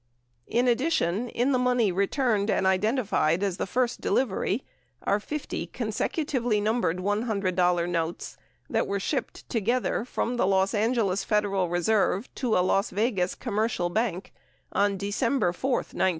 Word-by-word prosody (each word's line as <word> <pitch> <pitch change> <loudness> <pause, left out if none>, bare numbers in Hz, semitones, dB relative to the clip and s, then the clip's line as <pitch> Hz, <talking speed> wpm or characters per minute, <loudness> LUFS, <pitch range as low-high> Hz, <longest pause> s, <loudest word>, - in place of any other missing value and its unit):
In 245 +2 +1
addition, 245 - +1
in 245 +5 0
the 255 - +2
money 250 -5 +2
returned 205 +2 +1
and 190 - +1
identified 190 - +2
as 190 -3 -1
the - - -2
first 250 +4 0
delivery 235 -1 0 0.4
are 200 - +2
50 300 +7 -4
consecutively 245 -8 -1
numbered 210 -5 0
$100 185 -4 +1
notes 170 -1 -3 0.3
that - - 0
were 200 0 -1
shipped 265 +8 -3
together 235 +2 0
from 245 0 -2
the 215 - +2
Los 190 +1 +2
Angeles 215 -3 +1
Federal 200 -4 +1
Reserve 195 +4 +1
to 245 -5 0
a 180 - +3
Las 195 +3 +2
Vegas 200 -4 0
commercial 215 -6 -1
bank 205 -3 -2 0.4
on 200 -1 +1
December 205 0 0
4, 260 +9 -3
1968. 235 -6 +1
210 Hz, 140 wpm, -27 LUFS, 190-245 Hz, 0.4 s, a